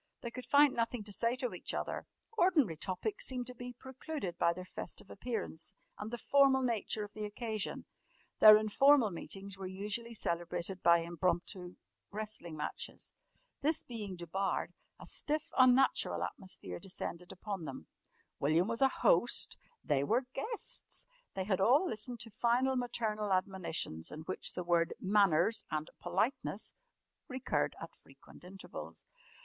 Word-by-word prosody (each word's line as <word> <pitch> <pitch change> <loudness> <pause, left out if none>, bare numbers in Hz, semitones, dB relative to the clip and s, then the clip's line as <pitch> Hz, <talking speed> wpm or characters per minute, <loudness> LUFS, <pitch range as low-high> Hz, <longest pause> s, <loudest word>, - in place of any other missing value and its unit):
They 235 - -5
could 255 +1 -7
find 285 -1 +6
nothing 230 -1 -1
to 205 0 -4
say 230 +4 +2
to 255 -2 -3
each - - -4
other. - - -3 0.3
Ordinary 330 - +4
topics 190 - -2
seemed 250 -2 -1
to 250 - -7
be 245 0 -7
precluded 265 - -5
by 170 - +4
their 180 +1 -6
festive 190 - -7
appearance 195 -6 -4 0.2
and 210 - -4
the 240 - -4
formal 270 +1 +4
nature 225 -3 0
of 205 0 -8
the 215 - -5
occasion. 215 0 -3 0.5
Their 215 -1 +11
informal 225 +2 +5
meetings 195 +3 -5
were 190 - -4
usually 210 +5 -3
celebrated 175 0 -2
by 170 0 +6
impromptu 175 +1 -1 0.3
wrestling 205 -6 -6
matches. 150 - -5 0.5
This 310 +2 +1
being 210 -6 -5
debarred, 180 +3 -2 0.3
a - - -10
stiff, 310 +2 -1
unnatural 255 +1 +4
atmosphere 90 - -5
descended 180 -1 -5
upon 190 -3 -5
them. 130 - -7 0.5
William 160 +6 +3
was 230 +2 -2
a 270 - +8
"host," - - +2 0.3
they 140 -2 +2
were 235 - +2
"guests"; 460 - -3 0.3
they 190 - -1
had 190 -1 0
all 265 - +5
listened 235 -1 -4
to 230 -1 -8
final 245 +5 +2
maternal 220 -4 -1
admonitions 185 - -1
in 155 - -6
which 185 +4 -2
the 180 - -3
word 170 -1 +2
"manners" 200 0 +3
and 155 0 -3
"politeness" 190 +9 -1 0.5
recurred 260 -3 -1
at - - -8
frequent - - -17
intervals. 190 +2 -9
210 Hz, 145 wpm, -34 LUFS, 180-250 Hz, 0.5 s, Their